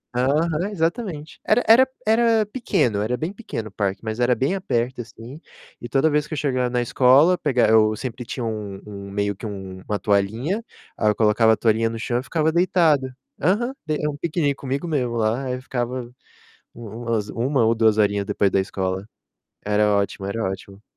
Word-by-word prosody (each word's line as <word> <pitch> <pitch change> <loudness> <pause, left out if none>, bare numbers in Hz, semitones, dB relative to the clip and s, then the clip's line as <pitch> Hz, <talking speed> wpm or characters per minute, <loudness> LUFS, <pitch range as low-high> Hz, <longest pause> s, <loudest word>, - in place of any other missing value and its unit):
Aham, 155 +8 +1
exatamente. 165 -3 -3
Era 235 +3 +3
era 250 +4 +7 0.2
era 225 -1 +3
pequeno, 180 - 0
era 125 +4 -1
bem 170 +6 -3
pequeno 155 - -6
o - - -22
parque, 100 -1 -2
mas 110 +1 -4
era 120 +1 +4
bem 135 +9 0
aberto 125 - -2
assim, 120 +5 -11 0.4
e 120 - -7
toda 135 +5 +3
vez 150 0 +1
que 155 - -8
eu 155 - -3
chegava 130 -3 0
na 125 0 0
escola 135 +9 +5
pega 130 -7 +2
eu 110 -1 +5
sempre 125 +1 -6
tinha 125 -1 -4
um 105 -3 -5
um 100 -1 -9
meio 100 0 -1
que 110 - -9
um 95 -2 -7
uma 105 -1 -1
toalhinha, 110 - 0 0.3
aí 105 - +2
eu 105 - +1
colocava 110 +1 +4
a - - -1
toalhinha 115 0 +2
no 115 0 -6
chão 120 +1 -1
e - - -6
ficava 160 +1 0
deitado. 170 -7 +3 0.3
Aham, 215 - +1
d 155 -1 -1
é 150 - 0
um 145 - -4
piquinique 155 -3 0
comigo 140 +5 -4
mesmo 125 -7 -1
lá, 115 +4 0
aí 125 -1 -3
ficava 125 -1 -3 0.7
umas 115 -1 -4
u - - -8
1 130 -1 +2
ou 115 - +4
2 110 -1 +3
horinhas 100 -1 +2
depois 100 -1 +1
da 95 - +2
escola. 95 0 -2 0.6
Era 105 0 +2
ótimo, 100 -1 -1
era 115 +3 -3
ótimo. 95 +1 -5
120 Hz, 195 wpm, -22 LUFS, 105-150 Hz, 0.7 s, era